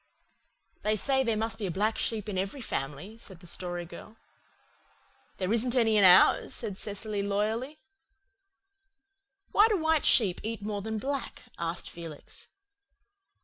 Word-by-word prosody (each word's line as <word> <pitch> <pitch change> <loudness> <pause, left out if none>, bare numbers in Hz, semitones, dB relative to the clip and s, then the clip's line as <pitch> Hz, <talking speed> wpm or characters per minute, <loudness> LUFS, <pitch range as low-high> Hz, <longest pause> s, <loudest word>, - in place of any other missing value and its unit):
"They 215 +1 +1
say 265 +5 +1
there 230 -3 0
must 225 +1 -2
be 205 - -2
a 175 - -5
black 215 +2 +1
sheep 220 -2 -1
in 205 - -4
every 195 +8 -3
family," 170 - -5
said 190 -6 -11
the 180 - -15
Story 175 0 -3
Girl. 215 +5 -12 1.2
"There 190 +2 -1
isn't 240 +2 +1
any 225 -3 +3
in 205 - +5
ours," 180 -1 +6
said 215 -5 -4
Cecily 205 +1 -2
loyally. 215 +8 -2 1.7
"Why 420 +2 +6
do 430 -3 +1
white 320 -2 +1
sheep 195 -7 +4
eat 220 -1 -4
more 205 -1 -3
than 220 +2 -4
black?" 275 +4 -4 0.2
asked 170 +1 -3
Felix. 165 -3 -10
215 Hz, 145 wpm, -29 LUFS, 190-230 Hz, 1.7 s, ours